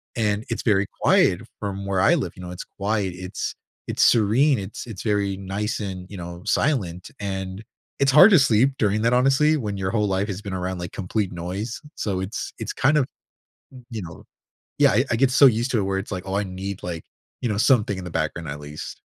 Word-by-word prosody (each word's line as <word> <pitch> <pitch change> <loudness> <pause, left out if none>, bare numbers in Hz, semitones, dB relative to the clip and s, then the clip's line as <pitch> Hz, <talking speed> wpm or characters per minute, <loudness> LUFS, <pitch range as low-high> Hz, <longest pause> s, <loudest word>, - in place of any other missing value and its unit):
and 105 -1 0
it's - - -3
very 100 -3 +2
quiet - - +4 0.2
from 100 -1 -4
where 100 -1 0
I 165 - +5
live. 150 - -2
You 90 - -9
know, 90 - -7
it's 90 - -6
quiet. 100 -2 -2
It's 90 +1 -4 0.3
it's - - -1
serene. 120 +6 +4
It's 100 +5 -7
it's 105 -5 -7
very 100 -3 0
nice 100 +3 -3
and, 95 -3 -5
you 100 - -9
know, 85 0 -7
silent. 95 - 0
And 95 0 -4 0.4
it's 140 -1 +4
hard 150 +9 +9
to 185 - +7
sleep 130 0 +4
during 105 0 +2
that, 115 - +3
honestly, 135 +5 +4
when 105 -7 -3
your 95 -1 -2
whole 105 -1 +1
life 95 +1 0
has 100 -1 -5
been 100 -3 -6
around, 90 0 -3
like, 85 0 -5
complete 100 +1 -2
noise. 95 +7 -5
So, 95 -3 -2
it's 95 +2 -5
it's - - -4
kind 145 +3 +3
of, 140 - +3 0.7
n 125 -2 -13
you 110 -2 -4
know 80 -2 -10 0.5
Yeah. - - +6
I 125 +6 +3
I - - +3
get 130 +1 +3
so 135 +2 +7
used 120 +1 +1
to 115 - +2
it - - 0
where 95 0 -1
it's 95 - -7
like, 90 -1 -4
oh, 95 - -2
I 100 - +1
need, 95 +1 -6
like, 85 -2 -5 0.4
you 120 - -1
know, 105 - -1
something 105 -4 +3
in 95 - -6
the 90 - -7
background 80 +1 -2
at 70 +1 -5
least. 75 +1 -8
100 Hz, 225 wpm, -23 LUFS, 95-115 Hz, 0.7 s, hard